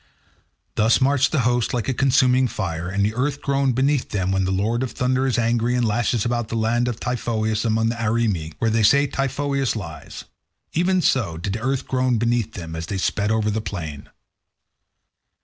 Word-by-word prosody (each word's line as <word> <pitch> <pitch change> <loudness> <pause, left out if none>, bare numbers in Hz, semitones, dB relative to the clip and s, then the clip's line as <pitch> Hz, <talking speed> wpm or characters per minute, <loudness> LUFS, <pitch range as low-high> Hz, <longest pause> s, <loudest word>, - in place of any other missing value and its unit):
Thus 110 +2 +3
marched 140 +1 +2
the 145 - +2
host 120 0 +1
like 120 - -2
a 135 - +1
consuming 130 0 +3
fire, 85 -6 -4
and 100 +1 +1
the 105 - -1
earth 140 +4 -1
groaned 135 -2 0
beneath 135 +1 +1
them 95 -3 -1
when 95 -1 +1
the 95 - -1
lord 110 +5 0
of 130 - -3
thunder 130 +1 0
is 125 - 0
angry 120 +1 +1
and 125 -1 +1
lashes 115 0 0
the 120 -1 -2
land 115 +2 +1
about 120 -3 -3
Typhoeus 110 -3 -1
among 110 0 +1
the 115 - -2
Arimi, 105 -8 0
where 115 - 0
they 115 +1 +2
say 140 +7 +5
Typhoeus 140 -1 -1
lies. 85 -8 -7 0.5
Even 180 +2 +2
so 100 -11 +1
did 90 +4 -3
the 110 - -4
earth 130 +2 -1
groan 130 -2 +1
beneath 115 -1 0
them 80 -3 -7
as 80 0 -5
they 100 - -3
sped 100 +2 0
over 110 -1 +1
the 110 +1 -1
plain. 80 -9 -6
115 Hz, 190 wpm, -22 LUFS, 105-130 Hz, 0.5 s, say